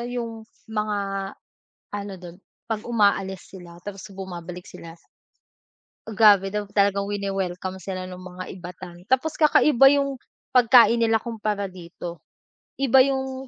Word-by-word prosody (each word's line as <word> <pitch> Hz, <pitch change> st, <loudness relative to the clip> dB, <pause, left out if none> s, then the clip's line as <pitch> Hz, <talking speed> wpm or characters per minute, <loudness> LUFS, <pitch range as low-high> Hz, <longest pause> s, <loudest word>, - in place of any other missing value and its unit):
'yung 240 Hz, -1 st, -4 dB, 0.4 s
mga 210 Hz, -1 st, -1 dB, 1.0 s
ano 205 Hz, -1 st, -5 dB
dun 175 Hz, -1 st, -10 dB, 0.3 s
'pag 220 Hz, -1 st, -3 dB
umaalis 200 Hz, -4 st, +1 dB
sila 175 Hz, -1 st, -12 dB
tapos 200 Hz, 0 st, -8 dB
bumabalik 180 Hz, -2 st, -7 dB
sila, 165 Hz, -, -10 dB, 1.2 s
grabe 205 Hz, -2 st, +6 dB
daw 210 Hz, 0 st, -1 dB
talagang 200 Hz, -1 st, +2 dB
wine-welcome 195 Hz, -2 st, -3 dB
sila 185 Hz, -1 st, -5 dB
nung 180 Hz, 0 st, -9 dB
mga 185 Hz, 0 st, -8 dB
Ivatan. 180 Hz, -1 st, -10 dB
Tapos 265 Hz, +5 st, +2 dB
kakaiba 295 Hz, -3 st, +6 dB
'yung 275 Hz, -1 st, +1 dB, 0.4 s
pagkain 235 Hz, -1 st, +6 dB
nila 225 Hz, -1 st, +3 dB
kumpara 215 Hz, -3 st, -3 dB
dito, 175 Hz, -1 st, -9 dB, 0.6 s
Iba 265 Hz, -1 st, +5 dB
'yung 265 Hz, -1 st, -3 dB
200 Hz, 120 wpm, -24 LUFS, 185-235 Hz, 1.2 s, grabe